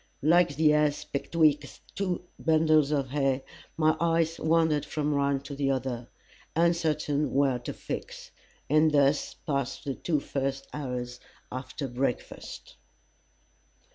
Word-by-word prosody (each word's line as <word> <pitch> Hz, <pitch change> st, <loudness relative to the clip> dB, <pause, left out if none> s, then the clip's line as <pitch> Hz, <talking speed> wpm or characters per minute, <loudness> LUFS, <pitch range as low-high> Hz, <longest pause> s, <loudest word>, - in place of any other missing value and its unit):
Like 165 Hz, -1 st, +4 dB
the 150 Hz, +1 st, +4 dB
ass 150 Hz, -1 st, +2 dB
betwixt 150 Hz, -1 st, +1 dB, 0.2 s
two 185 Hz, -3 st, -2 dB
bundles 155 Hz, -2 st, +3 dB
of 140 Hz, -4 st, -1 dB
hay, 135 Hz, -2 st, +1 dB, 0.3 s
my 155 Hz, 0 st, +3 dB
eyes 165 Hz, 0 st, +1 dB
wandered 160 Hz, -2 st, +2 dB
from 150 Hz, -1 st, -2 dB
one 140 Hz, -1 st, +1 dB
to 140 Hz, +1 st, -8 dB
the 140 Hz, -1 st, 0 dB
other 130 Hz, -3 st, -2 dB, 0.5 s
uncertain 155 Hz, -3 st, +1 dB
where 135 Hz, -3 st, +3 dB
to 120 Hz, -, -5 dB
fix. -, -, -7 dB, 0.4 s
And 155 Hz, +2 st, +4 dB
thus 145 Hz, 0 st, +2 dB
passed 140 Hz, -4 st, -3 dB
the 140 Hz, -, -1 dB
two 155 Hz, +2 st, -1 dB
first 135 Hz, 0 st, -3 dB
hours 125 Hz, -4 st, -4 dB, 0.3 s
after 130 Hz, +2 st, -5 dB
breakfast. 125 Hz, 0 st, -4 dB
145 Hz, 125 wpm, -28 LUFS, 135-155 Hz, 0.5 s, Like